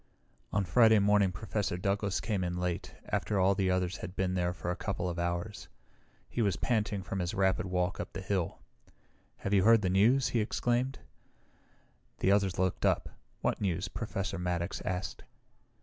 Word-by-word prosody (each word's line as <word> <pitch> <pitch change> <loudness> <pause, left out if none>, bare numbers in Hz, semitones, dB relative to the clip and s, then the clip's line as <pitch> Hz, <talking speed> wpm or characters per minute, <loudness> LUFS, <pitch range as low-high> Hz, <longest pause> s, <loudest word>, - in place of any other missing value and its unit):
On 100 +1 +1
Friday 110 +4 +6
morning 100 -1 +4
Professor 100 -1 -2
Douglas 100 -1 0
came 95 +5 -1
in 90 0 -2
late, 90 -1 -3
after 105 -2 0
all 95 +1 +4
the 95 -1 +1
others 90 0 0
had 90 - -7
been 95 -1 0
there 90 -1 +1
for 90 0 -4
a - - -2
couple 95 -2 -3
of 85 -1 -3
hours. 85 +4 -3 0.6
He 120 - -2
was 100 -3 +2
panting 105 -5 0
from 95 +2 -4
his 90 -1 -2
rapid 95 0 +2
walk 90 0 -1
up - - -5
the 95 - -5
hill. 95 -3 -1 0.9
"Have 100 - 0
you 95 -2 +5
heard 115 0 +6
the 90 - +1
news?" 115 +8 +4
he 120 - +1
exclaimed. 120 +4 0 1.2
The 95 - +2
others 100 -2 +2
looked 95 -1 0
up. - - +2 0.3
"What - - 0
news?" 95 -1 -1
Professor 100 -4 -3
Maddox 90 +1 -2
asked. 90 0 -3
95 Hz, 175 wpm, -31 LUFS, 90-105 Hz, 1.2 s, Friday